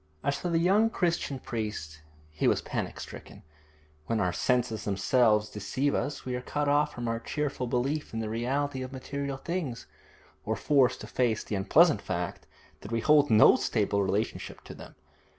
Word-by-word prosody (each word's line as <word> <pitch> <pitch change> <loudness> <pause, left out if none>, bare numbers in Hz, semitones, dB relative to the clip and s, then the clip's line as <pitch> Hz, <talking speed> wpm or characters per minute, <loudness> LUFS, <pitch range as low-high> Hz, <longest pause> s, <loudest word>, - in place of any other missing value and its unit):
As 140 - +1
for 175 - -3
the 170 - +2
young 195 +7 +4
Christian 170 -8 -1
priest, 105 -11 -5 0.3
he 75 - 0
was - - +2
panic - - -4
stricken. - - -10 0.6
When 115 -1 0
our 90 -3 +1
senses 120 -4 0
themselves 105 +2 +2
deceive 130 +8 -1
us 145 - -2
we 130 - -3
are 125 - -3
cut 145 +3 -2
off 145 +1 +3
from 120 -3 -5
our 115 0 -1
cheerful 145 -1 -3
belief 135 +5 -1
in 115 - -4
the 110 - -2
reality 130 +5 -1
of 130 0 -6
material 140 +1 -4
things, 165 -6 -4 0.6
or - - -1
forced 140 -4 +2
to - - -6
face 120 -4 0
the - - -6
unpleasant 150 - +4
fact 90 -1 -4 0.3
that 100 - -10
we 115 0 0
hold 150 +2 +5
no 110 -1 +7
stable 100 -2 0
relationship 100 +3 -2
to - - -10
them. - - -12
125 Hz, 175 wpm, -28 LUFS, 110-145 Hz, 0.6 s, no